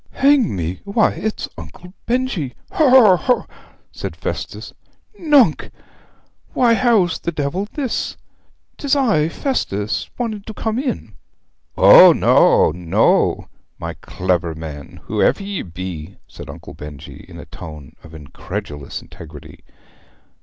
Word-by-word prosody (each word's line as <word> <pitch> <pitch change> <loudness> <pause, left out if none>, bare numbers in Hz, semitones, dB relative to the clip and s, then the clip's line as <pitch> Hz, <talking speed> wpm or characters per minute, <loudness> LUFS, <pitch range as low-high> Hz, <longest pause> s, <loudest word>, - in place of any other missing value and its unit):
'Hang 275 - +2
me 85 0 -4
why 205 +2 +2
it's 220 0 -4
Uncle 85 - -12
Benjy! 235 - -1 0.2
Haw 320 -8 +3
haw 240 -7 +7
haw?' 250 +7 0 0.5
said - - -6
Festus. - - -6 0.5
'Nunc, 285 - +3 0.8
why 240 -2 +3
how 230 -5 +3 0.2
the 170 - -2
devil's 170 +7 -3
this? 270 -5 -3 0.6
'Tis 285 -1 +1
I 210 - +2
Festus 110 - -2
wanting 225 -4 -3
to 220 - -7
come 220 +1 -2
in.' 230 - -4 0.6
'O - - +9
no, - - +4
no, 85 +1 +1 0.3
my - - -5
clever 90 -3 -2
man, 75 -3 -9
whoever - - +1
you 200 -1 -4
be!' 85 -3 -8
said - - -11
Uncle - - -10
Benjy 75 -2 -10
in - - -11
a - - -10
tone 75 -4 -11
of 80 -1 -13
incredulous 75 0 -7
integrity. 75 -2 -13
170 Hz, 125 wpm, -19 LUFS, -, 0.8 s, O